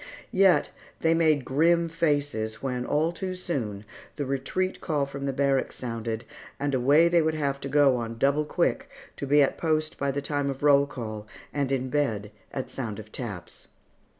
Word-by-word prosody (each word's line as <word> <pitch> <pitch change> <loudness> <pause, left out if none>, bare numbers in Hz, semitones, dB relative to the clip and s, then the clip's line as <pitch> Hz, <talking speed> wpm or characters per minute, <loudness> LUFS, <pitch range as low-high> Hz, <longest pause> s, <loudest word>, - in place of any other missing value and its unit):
Yet 190 -1 +4 0.3
they 165 0 +4
made 155 -5 +3
grim 165 +5 +3
faces 145 -9 0
when, 125 -2 -2
all 155 +3 +2
too 185 +1 -4
soon, 115 - -4 0.3
the 145 - -3
retreat 135 +8 -2
call 150 -4 0
from 140 0 -6
the 135 - 0
barracks 135 0 +1
sounded, 115 -1 -4 0.3
and 145 0 -1
away 140 +6 +5
they 170 0 +4
would 160 0 0
have 140 -2 -1
to 140 - -5
go 140 -2 +4
on 115 -1 -4
the - - -12
double 140 +4 +2
quick, - - 0 0.3
to 140 - -4
be 145 +1 +6
at 135 - -1
post 155 -1 0
by 140 - 0
the 140 +1 -1
time 145 0 -1
of 135 +1 -5
roll 140 -1 +5
call, 110 -5 -6 0.3
and 140 -2 -1
in 130 -1 -1
bed 110 -9 0 0.2
at 130 - -5
sound 115 -6 -4
of 110 0 -10
taps. 100 -8 -7
140 Hz, 185 wpm, -27 LUFS, 125-155 Hz, 0.3 s, be